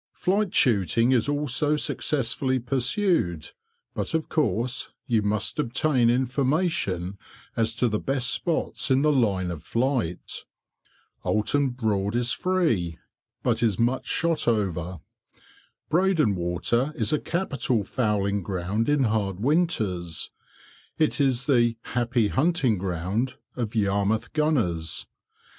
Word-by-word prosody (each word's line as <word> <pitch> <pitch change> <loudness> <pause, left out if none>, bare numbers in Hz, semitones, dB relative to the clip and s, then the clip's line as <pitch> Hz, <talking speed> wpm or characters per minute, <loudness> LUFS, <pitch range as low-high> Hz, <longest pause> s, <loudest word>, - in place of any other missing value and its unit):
Flight 200 +1 0
shooting 115 - +3
is 125 +1 +2
also 145 +1 +1
successfully 130 -3 0
pursued, 125 - 0 0.4
but - - -2
of 160 - -1
course 125 -5 0 0.2
you 115 -3 +2
must 105 +3 -1
obtain 130 -2 +2
information 125 - 0 0.4
as 115 -1 0
to 125 - +2
the 105 -2 0
best 135 -1 0
spots 165 -2 -1
in 135 +1 +3
the 150 - +4
line 100 -9 +1
of 80 -3 -6
flight. 115 -8 -1 0.8
Oulton 135 +6 +2
Broad 110 -4 -1
is 120 0 +1
free, 135 - 0 0.5
but - - +1
is 110 -6 +2
much 120 +3 0
shot 165 -4 0
over. 90 -6 -1 0.9
Breydon 165 - +3
Water 90 - 0
is 110 +4 0
a 150 - +2
capital 140 - -1
fowling 100 -3 0
ground 95 +5 -2
in 145 -2 +3
hard 105 -5 0
winters. 110 - 0 0.7
It 155 -2 +2
is 135 -2 +2
the 120 -5 +3
"happy 120 -3 0
hunting 135 - +2
ground" 95 +7 -2 0.2
of 120 -3 -3
Yarmouth 105 +2 0
gunners. 115 - 0
120 Hz, 120 wpm, -25 LUFS, 100-145 Hz, 0.9 s, the